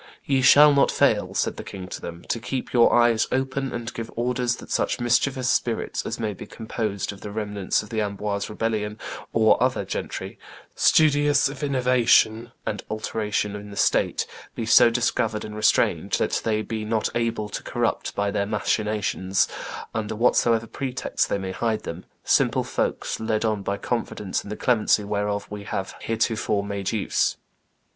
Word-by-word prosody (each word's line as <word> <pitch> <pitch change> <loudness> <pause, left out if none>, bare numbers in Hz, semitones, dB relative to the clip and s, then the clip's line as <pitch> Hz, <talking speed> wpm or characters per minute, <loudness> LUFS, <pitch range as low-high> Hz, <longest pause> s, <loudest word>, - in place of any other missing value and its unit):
"Ye 135 -2 +2
shall 145 +3 +8
not 140 - +4
fail," - - +2
said - - 0
the - - -6
king 95 -2 -8
to - - -6
them, 85 0 -8
"to 115 - 0
keep 125 +3 -4
your 120 -2 +5
eyes 120 -2 +4
open, 135 0 -1
and 120 -1 -5
give 115 -1 -5
orders 120 0 0
that - - -12
such - - 0
mischievous 125 +2 +1
spirits 120 -2 0
as - - -4
may 110 -2 -2
be - - -10
composed 110 -3 -3
of 100 - -14
the 105 - -6
remnants 105 -2 -1
of 105 - -12
the 110 -1 0
Amboise 100 0 -2
rebellion 105 -1 -2 0.3
or 110 -1 +4
other - - +1
gentry, - - -5 0.3
studious 145 -2 +4
of 140 -1 -8
innovation 125 -4 +3
and 105 - -3
alteration 105 -1 -2
in 105 0 -8
the 100 - -9
state, - - +2 0.3
be 115 - -3
so 115 +1 +7
discovered 115 -2 0
and 105 - -8
restrained 105 0 +2
that - - +1
they 110 -1 0
be 110 -1 -4
not 110 0 0
able 115 -2 -1
to - - -5
corrupt - - -2
by 100 0 0
their 100 -1 -1
machinations, 105 -2 0 0.5
under 110 -1 -3
whatsoever 115 0 +3
pretexts 130 +2 -2
they - - 0
may 95 -1 -4
hide 110 +2 -1
them, 85 +2 -7 0.2
simple - - +2
folks - - -2
led 110 0 0
on 110 -2 0
by 100 +1 -2
confidence 105 -4 -3
in - - -10
the 105 - -5
clemency 110 -3 +2
whereof 105 0 -2
we 105 -1 -6
have 95 -1 -4
heretofore 110 -2 0
made 100 -1 -3
use." 110 -3 0
110 Hz, 170 wpm, -24 LUFS, 105-120 Hz, 0.5 s, shall